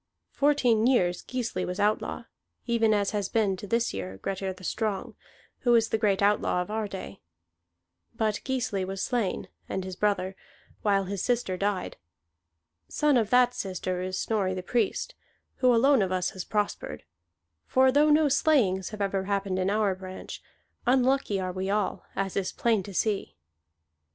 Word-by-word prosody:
Fourteen 245 Hz, -6 st, +3 dB
years 180 Hz, -9 st, +2 dB
Gisli 235 Hz, -8 st, -3 dB
was 180 Hz, +2 st, -4 dB
outlaw, 210 Hz, +1 st, 0 dB, 0.4 s
even 230 Hz, -2 st, +2 dB
as 205 Hz, -2 st, +2 dB
has 205 Hz, -2 st, -2 dB
been, 210 Hz, -4 st, +1 dB
to 205 Hz, -, -8 dB
this 230 Hz, +3 st, 0 dB
year, 95 Hz, 0 st, -5 dB
Grettir 190 Hz, -, -3 dB
the 185 Hz, 0 st, -12 dB
Strong, 210 Hz, 0 st, -2 dB, 0.5 s
who 240 Hz, -2 st, +3 dB
is 225 Hz, -1 st, +3 dB
the -, -, +1 dB
great 200 Hz, -2 st, +2 dB
outlaw 205 Hz, -3 st, +2 dB
of 180 Hz, +3 st, -3 dB
our 220 Hz, -1 st, -1 dB
day. 190 Hz, -, -8 dB, 0.9 s
But 215 Hz, -2 st, 0 dB
Gisli 245 Hz, -7 st, -1 dB
was 190 Hz, +1 st, -4 dB
slain, 235 Hz, -7 st, -1 dB, 0.2 s
and 190 Hz, -, -2 dB
his 185 Hz, 0 st, -6 dB
brother, 195 Hz, -1 st, 0 dB, 0.5 s
while 200 Hz, -2 st, +2 dB
his 195 Hz, 0 st, -3 dB
sister 240 Hz, -6 st, 0 dB
died. 200 Hz, 0 st, -2 dB, 0.9 s
Son 300 Hz, -2 st, +2 dB
of 225 Hz, -4 st, +2 dB
that 250 Hz, 0 st, +4 dB
sister 185 Hz, -5 st, -3 dB
is 185 Hz, 0 st, -3 dB
Snorri 195 Hz, -4 st, 0 dB
the 185 Hz, -, -5 dB
Priest, 240 Hz, -, -1 dB, 0.4 s
who 255 Hz, -1 st, +4 dB
alone 260 Hz, +2 st, +5 dB
of 190 Hz, -1 st, 0 dB
us 185 Hz, -1 st, 0 dB
has 185 Hz, -2 st, -6 dB
prospered; 210 Hz, -1 st, -2 dB, 0.6 s
for 260 Hz, 0 st, +4 dB
though 295 Hz, +3 st, +4 dB
no 300 Hz, 0 st, +5 dB
slayings 245 Hz, -, +2 dB
have 215 Hz, -1 st, -7 dB
ever 195 Hz, -1 st, 0 dB
happened 195 Hz, -1 st, -1 dB
in 185 Hz, +1 st, +1 dB
our 205 Hz, -1 st, +2 dB
branch, 185 Hz, 0 st, -8 dB, 0.5 s
unlucky 255 Hz, -4 st, +2 dB
are 185 Hz, -1 st, -2 dB
we 190 Hz, +1 st, -3 dB
all, 205 Hz, -1 st, -1 dB
as 195 Hz, -1 st, -2 dB
is 195 Hz, -2 st, -1 dB
plain 225 Hz, -4 st, +1 dB
to 195 Hz, +1 st, -9 dB
see." 195 Hz, -, -1 dB
205 Hz, 165 wpm, -27 LUFS, 190-235 Hz, 0.9 s, alone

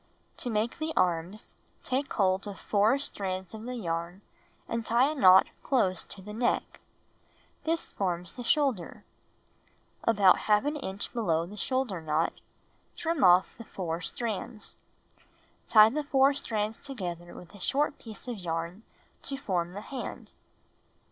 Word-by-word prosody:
To 245 Hz, -, -3 dB
make 220 Hz, +4 st, -1 dB
the 315 Hz, 0 st, -2 dB
arms, 180 Hz, +3 st, 0 dB, 0.3 s
take 270 Hz, +2 st, -1 dB
hold 190 Hz, -1 st, +1 dB
of 200 Hz, -2 st, -7 dB
4 215 Hz, +5 st, +3 dB
strands 190 Hz, -8 st, -4 dB
of 220 Hz, +1 st, -8 dB
the 250 Hz, 0 st, -4 dB
yarn 170 Hz, -2 st, -3 dB, 0.5 s
and 230 Hz, 0 st, -2 dB
tie 240 Hz, +6 st, +3 dB
a -, -, -2 dB
knot 190 Hz, -10 st, +7 dB, 0.2 s
close 195 Hz, -9 st, +1 dB
to 190 Hz, -, -9 dB
the 210 Hz, +2 st, -8 dB
neck. 235 Hz, +2 st, -1 dB, 0.9 s
This 330 Hz, +1 st, 0 dB
forms 180 Hz, -3 st, -2 dB
the 245 Hz, -, -7 dB
shoulder. 260 Hz, -, +1 dB, 1.0 s
About 200 Hz, -5 st, +5 dB
^ 280 Hz, +8 st, +1 dB
inch 190 Hz, +2 st, -5 dB
below 170 Hz, -9 st, +1 dB
the 200 Hz, +4 st, -10 dB
shoulder 235 Hz, -4 st, -1 dB
knot, 155 Hz, +1 st, 0 dB, 0.6 s
trim 330 Hz, -3 st, -1 dB
off 180 Hz, 0 st, +6 dB
the -, -, -6 dB
4 170 Hz, -5 st, -4 dB
strands. 215 Hz, +4 st, -4 dB, 0.9 s
Tie 215 Hz, 0 st, +8 dB
the 300 Hz, +4 st, -1 dB
4 275 Hz, 0 st, +4 dB
strands 220 Hz, -5 st, -2 dB
together 175 Hz, -10 st, -6 dB
with 180 Hz, -, -12 dB
a 205 Hz, -, -12 dB
short 290 Hz, +8 st, 0 dB
piece 220 Hz, +1 st, -10 dB
of 240 Hz, -4 st, -4 dB
yam 170 Hz, +3 st, -4 dB, 0.4 s
to 275 Hz, -, -4 dB
form 180 Hz, -8 st, -2 dB
the 205 Hz, -, -6 dB
hand. 265 Hz, +3 st, -7 dB
210 Hz, 145 wpm, -29 LUFS, 180-250 Hz, 1.0 s, Tie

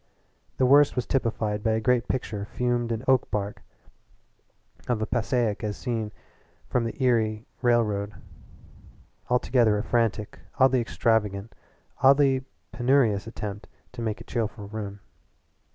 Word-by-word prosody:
The 130 Hz, -, +3 dB
worst 145 Hz, +2 st, +6 dB
was 125 Hz, -2 st, -1 dB
typified 110 Hz, -5 st, -1 dB
by 110 Hz, +1 st, +1 dB
a 110 Hz, -, +1 dB
great 125 Hz, +1 st, +1 dB
picture 105 Hz, -5 st, -3 dB
framed 120 Hz, 0 st, -1 dB
in 115 Hz, +1 st, -2 dB
oak 130 Hz, -1 st, +3 dB
bark 100 Hz, -1 st, -3 dB, 1.3 s
of 110 Hz, -3 st, 0 dB
Passaic 120 Hz, -2 st, 0 dB
as 105 Hz, -1 st, -3 dB
seen 115 Hz, -4 st, -3 dB, 0.6 s
from 120 Hz, -2 st, 0 dB
the 115 Hz, +3 st, -4 dB
Erie 110 Hz, -3 st, +1 dB, 0.2 s
Railroad 110 Hz, -4 st, +1 dB, 1.1 s
altogether 120 Hz, -3 st, +3 dB
a 105 Hz, -, -2 dB
frantic, 115 Hz, -2 st, -1 dB, 0.2 s
oddly 130 Hz, -2 st, +4 dB
extravagant, 110 Hz, -3 st, 0 dB, 0.5 s
oddly 135 Hz, -1 st, +5 dB, 0.3 s
penurious 120 Hz, -5 st, +2 dB
attempt 105 Hz, -2 st, -6 dB, 0.2 s
to 125 Hz, -, -8 dB
make 110 Hz, -2 st, -2 dB
a -, -, -9 dB
cheerful 110 Hz, -3 st, -3 dB
room. 105 Hz, -2 st, -6 dB
115 Hz, 125 wpm, -26 LUFS, 105-125 Hz, 1.3 s, worst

